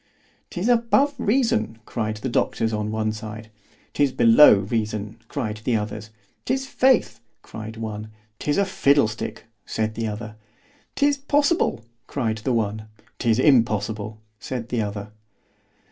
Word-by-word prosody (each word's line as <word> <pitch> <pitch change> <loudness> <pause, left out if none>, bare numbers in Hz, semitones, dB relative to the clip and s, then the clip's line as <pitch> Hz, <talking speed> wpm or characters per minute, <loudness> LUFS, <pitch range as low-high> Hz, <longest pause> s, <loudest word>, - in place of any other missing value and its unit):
'Tis 180 +5 -3
above 245 +4 +3
reason, 205 - +1
cried 110 -2 -3
the 120 - -4
doctors 115 -2 0
on 105 0 -2
one 110 0 -1
side. 110 0 -8 0.4
'Tis 145 -2 +2
below 115 +2 +7
reason, 105 0 -2
cried 110 -6 -3
the 120 - +1
others. 105 0 -4 0.3
'Tis 265 +1 -1
faith, 260 - +2 0.2
cried 110 +1 -8
one. 110 -1 -5 0.3
'Tis 145 - 0
a 200 - +3
fiddle 140 - +3
stick, 110 0 -6 0.2
said 110 0 -2
the 115 0 -3
other. 110 0 -6 0.6
'Tis 285 0 +2
possible, 285 - +1 0.2
cried 110 -5 -2
the 120 +4 -2
one. 110 -2 -1 0.3
'Tis 115 -2 +2
impossible, 110 -5 +2 0.2
said 120 +1 -5
the 120 -2 0
other. 100 0 -5
110 Hz, 135 wpm, -23 LUFS, 110-145 Hz, 0.6 s, below